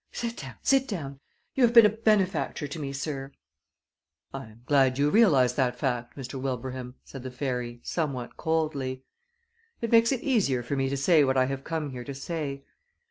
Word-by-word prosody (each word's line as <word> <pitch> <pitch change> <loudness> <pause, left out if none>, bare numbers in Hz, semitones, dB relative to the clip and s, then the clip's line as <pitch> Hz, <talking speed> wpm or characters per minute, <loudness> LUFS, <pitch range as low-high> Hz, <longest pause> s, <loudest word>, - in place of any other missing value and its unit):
"Sit 235 -1 -4
down, 130 -4 -8
sit 270 -1 +3
down! 140 -9 -5 0.3
You 265 - +2
have 240 0 +4
been 230 -2 +10
a - - +6
benefactor 195 -10 +1
to 145 +3 -6
me, 140 -2 -4
sir." 140 -1 -4 1.0
"I 135 0 -6
am 110 +2 -17
glad 135 -2 +3
you 145 +1 +2
realize 140 - +5
that 125 -1 0
fact, 120 -2 -2
Mr. 130 0 -6
Wilbraham," 130 -1 -4
said 135 - -9
the 130 - -6
fairy, 125 -2 -4
somewhat 140 -7 -3
coldly. 145 -5 -1 0.8
"It 230 - -3
makes 230 +1 +6
it 260 -3 -1
easier 190 - +1
for 130 +4 -3
me 135 -1 0
to 140 - -2
say 150 +2 +4
what 130 -1 +1
I 130 - +4
have 135 0 -4
come 160 -3 -3
here 125 -1 -6
to 140 +2 -7
say. 140 -1 -4
140 Hz, 190 wpm, -27 LUFS, 130-165 Hz, 1.0 s, been